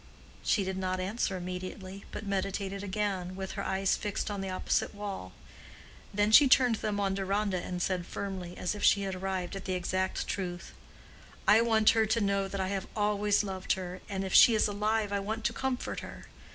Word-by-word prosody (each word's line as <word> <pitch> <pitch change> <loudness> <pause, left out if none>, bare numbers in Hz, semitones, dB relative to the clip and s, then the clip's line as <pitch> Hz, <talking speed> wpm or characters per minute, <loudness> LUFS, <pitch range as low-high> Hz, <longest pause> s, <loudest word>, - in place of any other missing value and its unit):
She 205 - +2
did 190 0 -3
not 185 -1 -1
answer 195 0 -1
immediately, 185 +2 -6
but 220 - -6
meditated 195 0 -2
again, 190 -2 -2
with 190 0 -5
her - - -4
eyes 190 0 +1
fixed 210 0 -3
on 200 -1 -3
the 195 - -3
opposite 185 +2 -1
wall. 200 - -5 0.8
Then 205 +1 +2
she 280 +5 +9
turned 250 -3 +5
them 205 -1 -2
on 195 -1 +1
Deronda 195 -1 0
and 180 -1 -4
said 180 -2 -1
firmly, 185 -3 -5
as 180 - -1
if 205 - -7
she 200 - +5
had 195 -1 -2
arrived 185 -1 -3
at 195 - -7
the 185 - -1
exact 185 +1 -1
truth, 180 -2 -4 0.7
"I 215 +2 +7
want 220 -2 +5
her 225 -1 +2
to 220 +2 +2
know 200 -2 +1
that 195 0 -5
I 190 0 -1
have 195 -1 -3
always 210 -1 +2
loved 190 -2 -1
her, 185 -1 -6
and 195 -1 -2
if 190 - -4
she 235 - +8
is 215 - +3
alive 210 0 0
I 200 - +1
want 220 +3 -3
to 235 - +1
comfort 260 0 -2
her. - - -9
195 Hz, 200 wpm, -30 LUFS, 185-210 Hz, 0.8 s, she